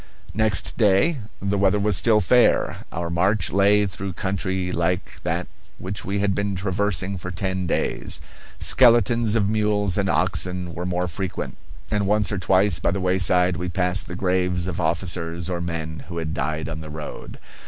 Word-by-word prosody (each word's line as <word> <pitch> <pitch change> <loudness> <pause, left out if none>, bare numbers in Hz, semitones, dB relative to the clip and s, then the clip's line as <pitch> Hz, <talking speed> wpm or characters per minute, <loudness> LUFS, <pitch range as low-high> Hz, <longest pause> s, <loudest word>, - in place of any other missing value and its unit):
Next 105 -6 +1
day 110 - +3 0.2
the 100 0 -1
weather 100 +1 +3
was 105 0 +1
still 110 -2 +4
fair. 120 +5 +3
Our 85 0 -3
march 95 +5 +1
lay 100 +1 +4
through 95 0 -5
country 95 -1 -2
like 90 +1 -2
that - - -2 0.3
which 95 +2 -5
we 100 +2 -2
had 100 0 +1
been 100 0 -1
traversing 95 0 -1
for 90 - -6
ten 95 0 -2
days. - - -1 0.4
Skeletons 115 -2 +4
of 105 -4 +2
mules 105 -2 +1
and 100 -1 0
oxen 90 -1 0
were 90 +3 -4
more 90 0 -1
frequent; 95 +3 -4 0.4
and 105 -2 0
once 105 0 +2
or 105 - -1
twice 95 -1 +3
by - - +1
the 95 +3 -1
wayside 90 -1 +3
we 90 +1 -3
passed 90 +1 0
the 90 - -6
graves 90 -1 0
of 90 -1 -3
officers 85 +1 -1
or 85 -1 -2
men 80 -4 -5
who 85 -1 -7
had 80 -1 -3
died 80 +1 -2
on 80 0 -5
the 80 - -8
road. 75 0 -8
95 Hz, 175 wpm, -23 LUFS, 85-100 Hz, 0.4 s, still